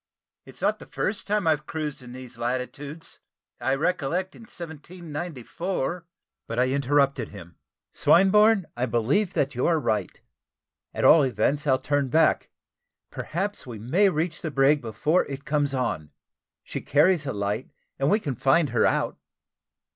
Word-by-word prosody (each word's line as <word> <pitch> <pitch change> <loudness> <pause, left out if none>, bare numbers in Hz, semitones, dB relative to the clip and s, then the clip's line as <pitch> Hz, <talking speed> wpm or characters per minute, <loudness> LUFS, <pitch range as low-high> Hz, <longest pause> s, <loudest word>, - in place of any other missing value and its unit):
It's - - -12
not - - +1
the - - -12
first 200 - -2
time 210 -2 +1
I've 155 -2 +1
cruised 150 -4 -4
in 125 -1 -11
these 125 -2 -10
latitudes. 130 +6 -4 0.4
I 135 - +1
recollect 175 +3 -1
in - - -13
1794 170 0 -5 0.2
" - - -62
But 115 - -5
I 125 +1 +3
interrupted 140 -2 +1
him: 85 -5 -12 0.3
"Swinburne, 200 +2 +5
I 125 +2 -1
believe 135 - +1
that 140 0 0
you 125 - 0
are 165 -2 +3
right. 110 -7 -2 0.7
At - - -1
all 160 - +8
events 140 +2 0
I'll 130 -1 +4
turn 140 +1 0
back; 160 +5 +3 0.6
perhaps 195 0 -4
we 120 -3 -7
may 165 - +3
reach 160 0 -2
the 160 - -3
brig 140 +1 +3
before 120 - +1
it 140 0 -7
comes 145 -2 +1
on. 125 - -2 0.5
She - - -5
carries 155 +1 +3
a 135 - -2
light, 105 +4 -2 0.3
and 135 +1 +2
we 210 - +3
can 145 -10 -3
find 135 +5 +2
her 120 -2 +3
out." - - -1
145 Hz, 155 wpm, -25 LUFS, 125-170 Hz, 0.7 s, all